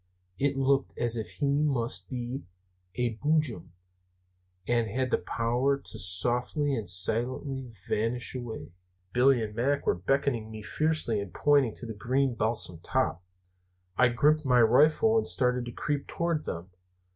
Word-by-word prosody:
It 140 0 +1
looked 135 0 +1
as 120 -1 -1
if 110 -2 -4
he 145 - -3 0.2
must 115 -10 -1
be 125 +2 -4 0.5
a 120 0 0
Boojum, 150 - 0 1.0
and 120 -1 +2
had 130 +4 -2
the - - +2
power 120 +4 0
to 115 -5 -9
'softly 120 - 0
and 110 -7 -3
silently 125 +7 -1 0.2
vanish 115 +3 -1
away.' 115 -10 -6 0.4
"Billy 125 -1 +4
and 105 -1 -5
Mac 135 +6 0
were - - +3
beckoning 120 +4 0
to - - -12
me 110 -1 -8
fiercely 155 -3 0
and 100 -3 -5
pointing 140 - +3
to - - -8
the 115 - -5
green 130 +5 0
balsam 110 -6 0
top. 85 +1 -1 0.7
I 125 - +5
gripped 150 +6 +3
my 125 -3 +4
rifle 155 - +4
and 220 - +1
started 125 -1 +1
to 120 - -6
creep 145 +3 -3
toward 170 -2 -1
them. 85 +3 -6
125 Hz, 155 wpm, -28 LUFS, 110-140 Hz, 1.0 s, I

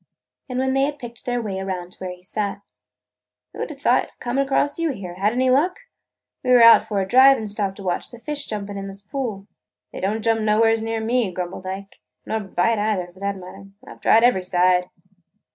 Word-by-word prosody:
And 250 - -3
when 265 0 +1
they 270 - +2
had 290 0 -4
picked 240 -3 -10
their 245 0 0
way 195 -3 -3
around 185 -2 -4
to - - -10
where 185 - -5
he 180 0 -12
sat, 200 +1 -3 0.9
"Who - - -4
'd - - -6
have - - -10
thought - - +3
of - - -23
coming 255 +3 0
across 285 +2 0
you 335 -1 +1
here? 185 -6 -7
Had 195 +4 +1
any 255 +2 +2
luck? 325 - +2 0.6
We 255 - -2
were 245 -2 +7
out 230 -1 +8
for 205 -3 0
a 190 - -2
drive 265 +4 +7
and 220 - -5
stopped 200 -2 -2
to 200 - -10
watch 180 -2 -2
the 240 - -12
fish 285 +4 -4
jumping 205 -2 -4
in 195 - -6
this 195 0 -8
pool." 210 -3 -4 0.5
"They - - -6
don't 210 +3 -1
jump 225 -1 +2
nowheres 220 +1 +3
around 225 0 -2
me," 235 -4 +1
grumbled 180 +1 -5
Ike, 195 +1 -7 0.3
"nor 220 - -1
bite 205 +2 0
either, 205 -4 -1
for 185 - -18
that 200 0 -2
matter. 190 +2 -11 0.2
I - - -10
've - - -21
tried 225 - +5
every 240 -7 +4
side." 180 0 +2
210 Hz, 230 wpm, -22 LUFS, 190-245 Hz, 0.9 s, out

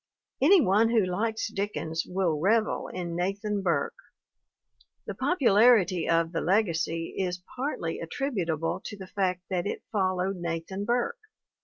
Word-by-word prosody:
Any 345 +6 +7
one 215 +1 +3
who 225 -4 +3
likes 220 +5 -1
Dick 205 0 -3
ens 160 +1 -3
will 180 -5 0
revel 215 +6 +1
in 175 -2 -5
Nathan 200 +3 -1
Burke. 170 -7 0 1.1
The - - -4
popularity 220 - +4
of 165 0 +2
The 165 - -2
Legacy 165 -4 0
is 180 -1 -2
partly 255 - -3
attributable 165 - -2
to 210 - -6
the 190 - -8
fact 185 -1 -1
that 180 0 0
it - - -4
followed 185 -2 0
Nathan 170 +3 -4
Burke. 245 - 0
190 Hz, 140 wpm, -28 LUFS, 170-215 Hz, 1.1 s, Any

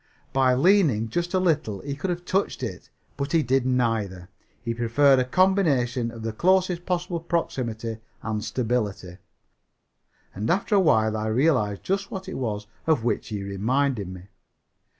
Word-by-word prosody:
By 130 -1 +3
leaning 140 - +3
just 175 - -2
a - - +4
little 155 - 0
he 140 - -4
could 185 +7 -3
have 175 0 -3
touched 195 +2 -1
it. - - -6 0.3
But 140 +2 -3
he 165 -2 +4
did 130 +1 +1
neither. 110 -8 -1 0.3
He 115 -1 -3
preferred 130 +4 +4
a - - +3
combination 135 -7 +2
of 115 -1 -9
the 115 -1 -3
closest 180 +4 +2
possible 180 -1 -1
proximity 120 -9 -3 0.2
and 110 -1 -2
stability. 105 -7 -2 1.1
And 105 +4 -3
after 195 +4 +1
a 200 - +6
while 110 - +3
I 110 0 -2
realized 110 -4 +1
just 195 +1 -1
what 190 -4 -6
it 190 - -5
was 105 -4 -3 0.2
of 155 -8 +2
which 120 - -1
he 105 -3 -4
reminded 110 +3 0
me. 90 -1 -9
125 Hz, 160 wpm, -25 LUFS, 110-170 Hz, 1.1 s, a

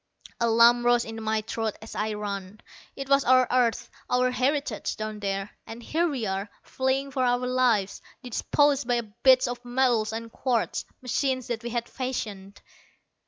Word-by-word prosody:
A 235 - +2
lump 235 +1 +6
rose 240 0 +3
in 225 0 -7
my 220 0 0
throat 220 0 -3
as 220 - -10
I 215 0 -2
ran. 200 -1 -5 0.4
It 275 - -6
was 275 0 +4
our 255 0 +5
earth, 245 -3 +2 0.2
our 250 0 +2
heritage 260 -2 -1
down 215 0 -5
there 195 0 -3 0.2
and 230 +1 -9
here 335 +7 0
we 265 -6 -3
were, 195 0 -2
fleeing 265 +1 -1
for 260 -1 0
our 245 0 +1
lives, 245 -6 +1 0.2
dispossessed 280 +2 +1
by 240 -1 +2
bits 255 +4 +3
of 245 0 -5
metal 245 -3 +2
and 225 +1 -6
quartz, 245 -3 -1 0.2
machines 255 0 0
that 230 -2 -2
we 240 - -5
had 235 0 -2
fashioned. 210 -7 -5
240 Hz, 165 wpm, -26 LUFS, 220-255 Hz, 0.4 s, lump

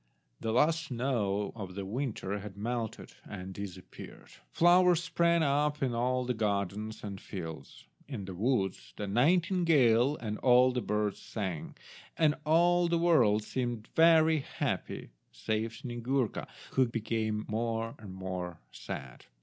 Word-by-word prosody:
The 110 - -2
last 160 +7 +3
snow 115 -6 -1
of 95 -5 -7
the 100 -1 -4
winter 105 -3 -3
had 100 0 -9
melted 115 +1 -4
and 95 -1 -7
disappeared. 95 -2 -9 0.2
Flowers 175 0 +5
sprang 170 -1 +2
up 145 0 +1
in 125 -3 0
all 125 +2 0
the 125 - 0
gardens 105 0 -2
and 100 -2 -6
fields. 80 -7 -8 0.2
In 120 -9 -5
the 95 - -6
woods 95 - -1
the - - -4
nightingale 145 - +3
and 105 -2 -4
all 125 0 +5
the 125 0 -1
birds 105 -1 -1
sang, 95 -8 -5 0.4
and 155 -2 +4
all 175 +2 +4
the 170 0 +2
world 125 -12 +4
seemed 120 -2 -3
very 160 -1 +6
happy 140 - -4 0.2
save 110 - -2
Snyegurka, 120 +1 -2 0.2
who 130 -1 +3
became 110 -2 -2
more 115 +1 -2
and 105 -3 -9
more 90 -2 -5
sad. 70 -2 -8
115 Hz, 135 wpm, -31 LUFS, 100-140 Hz, 0.4 s, very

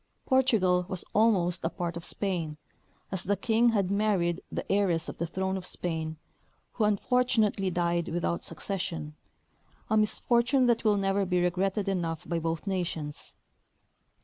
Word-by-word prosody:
Por 260 -1 +4
tugal 185 -7 +2
was 185 -2 -3
almost 190 -6 +3
a 165 - +1
part 175 -2 -4
of 170 - -6
Spain, 170 -6 -1 0.5
as 190 -2 -2
the 200 +2 0
King 230 +4 +3
had 200 -4 +1
married 195 -4 +1
the - - -3
heiress 185 -5 +2
of - - -7
the 170 - -1
throne 190 +2 -2
of 185 - -7
Spain, 160 -2 -3 0.5
who 220 - 0
unfortunately 210 -2 +2
died 170 -1 0
without 170 0 -1
succession 165 -3 -4 0.4
— - - -36
a 220 - +4
misfortune 240 +4 +2
that 235 -2 +2
will 210 -2 +3
never 195 0 +1
be 180 -1 +1
regretted 190 +3 0
enough 170 -4 -2
by 170 +1 -1
both 165 +2 -3
nations. 170 -6 -3
185 Hz, 155 wpm, -29 LUFS, 170-210 Hz, 0.5 s, Por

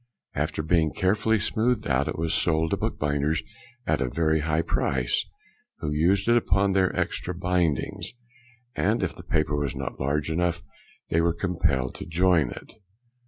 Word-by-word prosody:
After 75 +1 -2
being 80 -1 +2
carefully 105 +4 +2
smoothed 120 +4 0
out, 70 0 +1
it - - -3
was 80 0 -1
sold 80 -1 +1
to - - +1
bookbinders 75 +1 -1 0.4
at 65 - +1
a 65 - 0
very 80 +3 +1
high 80 +2 0
price, 65 -6 0 0.5
who 75 - -3
used 90 +7 +2
it 120 - +5
upon 100 -3 +3
their 95 -1 +3
extra 90 - -2
bindings, 90 -4 0 0.6
and 105 +2 +1
if 95 - -2
the - - -10
paper 75 -3 0
was 75 -1 -2
not 70 -2 -5
large 70 +3 0
enough 85 +1 0 0.5
they 85 - +2
were 85 0 +1
compelled 70 -10 0
to - - -8
join 85 -4 +3
it. - - -10
80 Hz, 165 wpm, -26 LUFS, 75-90 Hz, 0.6 s, it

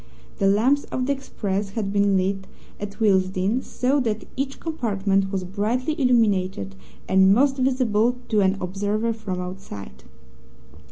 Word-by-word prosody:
The 195 - +3
lamps 245 +9 +3
of 255 - -3
the 280 - +1
express 205 -7 -3
had 200 -3 -1
been 200 -1 +3
lit 190 +1 -1 0.3
at 200 +1 -7
Willesden, 190 +2 +2
so 265 +3 0
that 220 -4 -2
each 270 0 -3
compartment 195 - 0
was 190 -2 -2
brightly 220 - -1
illuminated, 200 - +2 0.3
and 190 +1 +5
most 270 +3 +3
visible 250 -3 +2
to 215 -2 +3
an 190 0 +2
observer 205 +5 -1
from 205 -5 -5
outside. 105 - -8
205 Hz, 135 wpm, -23 LUFS, 190-245 Hz, 0.3 s, and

